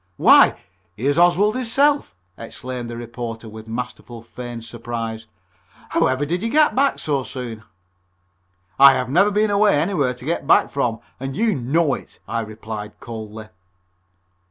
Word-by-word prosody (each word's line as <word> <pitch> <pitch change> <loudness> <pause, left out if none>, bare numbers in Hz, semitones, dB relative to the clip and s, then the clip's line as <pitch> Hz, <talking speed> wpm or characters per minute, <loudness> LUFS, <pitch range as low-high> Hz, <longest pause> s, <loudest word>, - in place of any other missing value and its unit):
"Why, - - +6 0.4
here's 140 +8 0
Oswald 175 +5 +4
hisself," 270 - +1 0.2
exclaimed 120 +1 -7
the 120 - -6
reporter 115 -1 -7
with 110 0 -11
masterfully 120 0 -6
feigned 120 -1 -8
surprise. 115 -1 -6 0.6
"However 130 +3 +1
did 175 +4 -2
you 230 - -1
get 305 +3 +4
back 275 +2 +2
so 145 -3 -1
soon?" 125 -4 -7 1.2
"I 140 0 +9
have 125 - -2
never 185 +9 +4
been 210 +1 +1
away 205 -6 +4
anywhere 150 -7 0
to 125 - -12
get 155 -3 -2
back - - +4
from, 120 -5 -1 0.2
and 135 +1 -5
you 225 -2 +2
know 140 +2 +1
it," - - -8
I 115 - -2
replied 110 -1 -7
coldly. 110 -3 -8
125 Hz, 145 wpm, -21 LUFS, 115-175 Hz, 1.2 s, I